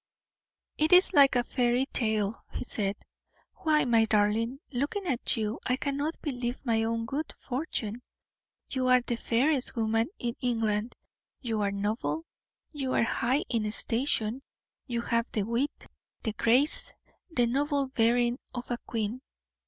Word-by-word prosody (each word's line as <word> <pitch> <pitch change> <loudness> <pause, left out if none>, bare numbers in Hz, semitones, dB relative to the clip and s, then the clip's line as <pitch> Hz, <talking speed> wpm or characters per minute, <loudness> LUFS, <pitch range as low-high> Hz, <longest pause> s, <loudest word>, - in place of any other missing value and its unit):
"It 310 +1 +3
is 365 +1 +7
like 280 -5 +6
a 245 - +3
fairy 245 +1 +1
tale," 220 -5 0
he - - -4
said. 205 -4 -1 0.6
"Why, 305 -3 +2
my 230 -2 +4
darling, 220 +4 +1
looking 290 +10 -2
at 260 -6 +1
you 215 +1 -2
I 250 - +1
cannot 285 +4 -2
believe 250 -3 -3
my 225 -2 +2
own 230 0 -1
good 285 +6 -3
fortune; 245 -4 -4 0.7
you 260 -1 0
are 255 0 +5
the 240 0 -2
fairest 255 +5 +2
woman 225 0 +1
in 235 -1 -2
England; 225 -2 0 0.4
you 225 -5 -2
are 200 - +1
noble, 210 +11 -2 0.5
you 270 -3 -2
are - - +4
high 245 +4 +1
in 215 -3 -1
station; 230 +1 +1 0.5
you 235 -2 -1
have 235 0 -1
the 210 - +1
wit, 235 +7 -2 0.4
the 220 - -1
grace, 275 - +2 0.3
the 250 -8 +2
noble 280 +3 +1
bearing 240 0 +2 0.2
of 245 0 -5
a 240 - -1
queen. 225 +2 -2
240 Hz, 145 wpm, -29 LUFS, 225-270 Hz, 0.7 s, is